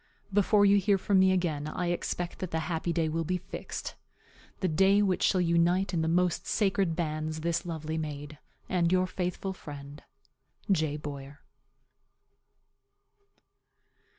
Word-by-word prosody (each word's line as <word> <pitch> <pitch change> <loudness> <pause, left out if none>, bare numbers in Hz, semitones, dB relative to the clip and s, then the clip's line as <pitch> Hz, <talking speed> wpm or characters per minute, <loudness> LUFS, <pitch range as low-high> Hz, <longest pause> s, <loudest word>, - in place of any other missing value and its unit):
Before 205 +1 +4
you 200 0 +6
hear 200 0 +3
from 195 0 +2
me 190 0 +5
again 160 -6 0
I 175 +2 -2
expect 175 0 -3
that 185 - -4
the 160 -1 -1
happy 165 +1 -2
day 165 -1 +1
will 165 +1 -1
be 180 +3 -1
fixed - - -6 0.7
the 185 - +1
day 195 +5 +4
which 190 -3 +1
shall 185 - +3
unite 175 +2 +2
in 165 - +1
the 160 - 0
most 175 +1 +1
sacred 195 -5 +1
bands 155 -1 -2
this 170 +1 -1
lovely 160 -1 -3
maid 150 -1 -6 0.3
and 175 -2 +1
your 185 0 +3
faithful 185 +1 -3
friend, 145 -4 -10 0.7
J. 155 -5 +1
BOYER. 140 -1 -8
170 Hz, 145 wpm, -29 LUFS, 155-185 Hz, 0.7 s, you